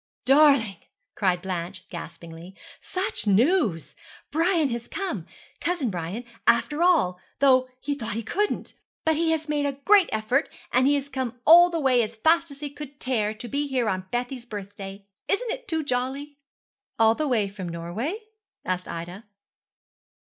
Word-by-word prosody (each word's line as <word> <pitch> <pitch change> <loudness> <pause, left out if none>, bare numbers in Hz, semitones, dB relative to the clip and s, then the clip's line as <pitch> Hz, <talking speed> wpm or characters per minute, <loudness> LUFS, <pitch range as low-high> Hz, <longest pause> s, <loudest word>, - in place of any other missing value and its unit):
'Darling,' 270 - +5 0.4
cried 180 -3 0
Blanche 185 0 -5
gaspingly, 170 +1 -9 0.2
'such 370 - -1
news. 210 - +2 0.4
Brian 330 -2 +2
has 235 0 -4
come 390 -1 -4 0.3
cousin 330 -10 -1
Brian 180 +6 -4 0.2
after 295 +7 +3
all, 310 - +3 0.2
though 255 -2 +4
he 285 +2 -2
thought 230 -6 -4
he 230 - -3
couldn't. 415 - -2 0.3
But 320 0 +3
he 320 0 +2
made 295 -1 0
a 280 - -1
great 400 -3 +6
effort, 220 +7 0 0.2
and 255 +2 +4
he 290 - +4
has 280 -1 -2
come 255 -3 -4
all 345 +3 +9
the 335 -1 -2
way 260 -4 +3
as 225 0 -3
fast 330 +8 +3
as 280 0 -11
he 290 -1 -4
could 285 -1 -10
tear 220 -5 -1
to 225 +3 -8
be 285 +3 -1
here 255 -4 0
on 185 -2 -2
Bessie's 245 +1 -3
birthday. 200 -1 -8 0.2
Isn't 455 +4 0
it - - -6
too 320 -4 -1
jolly?' 275 +2 -3 0.6
'All 225 0 +5
the 305 +5 -2
way 225 -6 +2
from 195 -3 -7
Norway?' 210 - -4 0.4
asked 180 0 -2
Ida. 175 +5 -7
255 Hz, 160 wpm, -25 LUFS, 200-300 Hz, 0.6 s, all